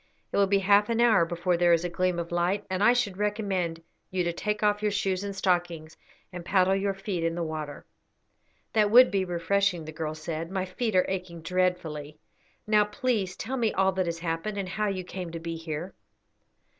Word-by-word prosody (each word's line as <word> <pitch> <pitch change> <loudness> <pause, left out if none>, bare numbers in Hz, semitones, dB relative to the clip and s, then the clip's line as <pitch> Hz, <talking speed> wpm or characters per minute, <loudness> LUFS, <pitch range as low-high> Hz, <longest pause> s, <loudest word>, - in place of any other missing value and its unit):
It - - -1
will 200 -1 +4
be 200 +1 +3
half 200 +2 +4
an 230 0 0
hour 220 -8 +5
before 175 +1 0
there 175 0 +4
is 170 +1 +2
a - - +1
gleam 180 +1 0
of 170 0 -4
light, 180 +4 0
and 190 +2 0
I 235 - +7
should 245 -6 0
recommend 195 -5 -1 0.3
you 185 -1 -1
to 170 0 -1
take 210 +4 -2
off 210 0 +2
your 210 - +2
shoes 195 -2 -1
and 200 -1 -4
stockings 175 -4 -1 0.4
and 175 -1 -6
paddle 190 +1 +3
your 195 0 -1
feet 195 -3 -3
in 165 0 0
the 175 - -2
water." 155 -2 -5 0.9
"That 215 -2 +3
would 250 +4 +7
be 195 -2 +1
refreshing," 180 0 0
the 155 - -7
girl 155 0 -4
said. 160 +1 -5
"My 190 0 -2
feet 215 +3 -2
are 185 - +4
aching 180 -3 -5
dreadfully. 170 -5 -1 0.5
Now 210 -1 +4
please 210 -4 -1
tell 260 +4 -4
me 230 -3 +1
all 190 0 +3
that 185 -2 -1
has 170 0 -2
happened, 165 +5 -3
and 195 -2 -3
how 210 +3 -1
you 190 -2 -2
came 180 -1 -6
to 165 - -4
be 165 0 -5
here." 165 +2 -5
185 Hz, 210 wpm, -27 LUFS, 170-205 Hz, 0.9 s, I